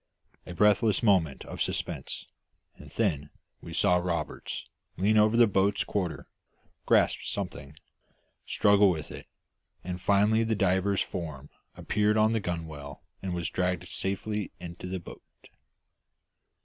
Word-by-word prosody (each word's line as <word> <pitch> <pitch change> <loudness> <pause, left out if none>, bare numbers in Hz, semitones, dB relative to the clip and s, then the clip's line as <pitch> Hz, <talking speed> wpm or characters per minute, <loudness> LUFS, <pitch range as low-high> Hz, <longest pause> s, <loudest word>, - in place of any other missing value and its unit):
A 90 - -6
breathless 105 +2 +3
moment 90 - +2
of - - -7
suspense, - - -3 0.5
and - - -13
then 75 0 -1 0.3
we 85 - -9
saw 90 +2 +3
Roberts 85 -3 -3 0.3
lean 100 +5 +2
over 110 +1 +4
the 120 - +8
boat's 100 -1 +2
quarter, 90 -8 -3 0.6
grasp - - +4
something, 70 +2 -5 0.7
struggle 100 -1 +4
with 80 -4 -3
it, - - -9 0.6
and 90 0 -5
finally 105 +4 +3
the 110 0 0
diver's 95 0 +2
form 75 -5 -5 0.3
appeared 105 +1 +1
on 110 +1 +4
the 115 - +1
gunwale 80 -6 -6 0.2
and 95 -2 -3
was 85 -1 -2
dragged 90 -1 -1
safely 100 +1 -2
into 85 +1 -8
the 95 0 -3
boat. 85 - -11
95 Hz, 130 wpm, -28 LUFS, 85-105 Hz, 0.7 s, the